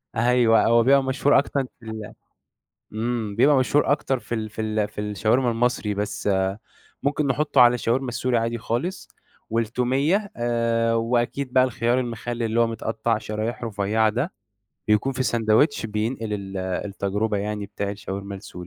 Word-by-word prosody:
أيوه، 120 Hz, -1 st, +4 dB
هو 115 Hz, 0 st, +4 dB
بيبقى 135 Hz, +2 st, +5 dB
مشهور 135 Hz, +2 st, +3 dB
أكتر 140 Hz, -1 st, -1 dB, 0.2 s
في 115 Hz, -, -16 dB
ال 110 Hz, -1 st, -7 dB, 0.8 s
إمم، 110 Hz, -2 st, -2 dB
بيبقى 140 Hz, +4 st, +5 dB
مشهور 140 Hz, +2 st, +3 dB
أكتر 135 Hz, -3 st, 0 dB
في 120 Hz, -, -5 dB
ال 110 Hz, -1 st, -3 dB
في 110 Hz, -, -7 dB
ال 110 Hz, -1 st, 0 dB
في 105 Hz, -, -7 dB
الشاورما 110 Hz, +5 st, +1 dB
المصري، 115 Hz, -3 st, 0 dB
بس 105 Hz, 0 st, -3 dB, 0.7 s
ممكن 145 Hz, +1 st, 0 dB
نحطُّه 140 Hz, +1 st, +2 dB
على 120 Hz, 0 st, +7 dB
الشاورما 125 Hz, +2 st, 0 dB
السوري 120 Hz, 0 st, 0 dB
عادي 115 Hz, +1 st, -1 dB
خالص، 130 Hz, +12 st, -3 dB, 0.4 s
والتوميّة 130 Hz, -, 0 dB
آآ، 115 Hz, -1 st, +1 dB
وأكيد 120 Hz, +3 st, 0 dB
بقى 130 Hz, 0 st, +5 dB
الخيار 120 Hz, 0 st, 0 dB
المخلِّل 120 Hz, 0 st, -4 dB
اللي 115 Hz, +1 st, +1 dB
هو 115 Hz, -, +4 dB
متقطع 115 Hz, 0 st, -1 dB
شرايح 110 Hz, +3 st, -4 dB
رفيّعة 110 Hz, +1 st, +1 dB
ده، 125 Hz, -, -2 dB, 0.6 s
بيكون 105 Hz, +6 st, +2 dB
في 130 Hz, +1 st, -1 dB
ساندويتش 115 Hz, +3 st, +2 dB
بينقل 110 Hz, +1 st, -2 dB
ال 100 Hz, -1 st, -5 dB
التجربة 100 Hz, +3 st, -2 dB
يعني 105 Hz, 0 st, -3 dB
بتاع 100 Hz, 0 st, -4 dB
الشاورما 100 Hz, -1 st, -6 dB
السوري. 95 Hz, +1 st, -11 dB
115 Hz, 155 wpm, -24 LUFS, 105-125 Hz, 0.8 s, على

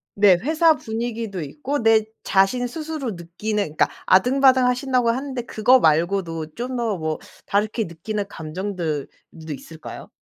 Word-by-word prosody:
네. 200 Hz, -2 st, +6 dB
회사 315 Hz, +3 st, +4 dB
분위기도 225 Hz, -, -4 dB
있고 285 Hz, -, -3 dB
내 225 Hz, -1 st, +5 dB, 0.2 s
자신 200 Hz, +6 st, +2 dB
스스로 305 Hz, -2 st, -4 dB
느끼는 190 Hz, +5 st, -3 dB
그러니까 155 Hz, -5 st, +1 dB, 0.2 s
아등바등하신다고 255 Hz, +2 st, +4 dB
하는데 260 Hz, +1 st, -2 dB
그거 245 Hz, +3 st, +4 dB
말고도 165 Hz, -2 st, +1 dB
좀 250 Hz, +2 st, -4 dB
더 240 Hz, -, -2 dB, 0.2 s
뭐 155 Hz, -1 st, -2 dB, 0.3 s
다르게 215 Hz, +3 st, 0 dB
느끼는 200 Hz, +5 st, -4 dB
감정들도 165 Hz, -3 st, -4 dB, 0.5 s
있을까요? 160 Hz, +3 st, -10 dB
220 Hz, 320 characters per minute, -22 LUFS, 175-255 Hz, 0.5 s, 네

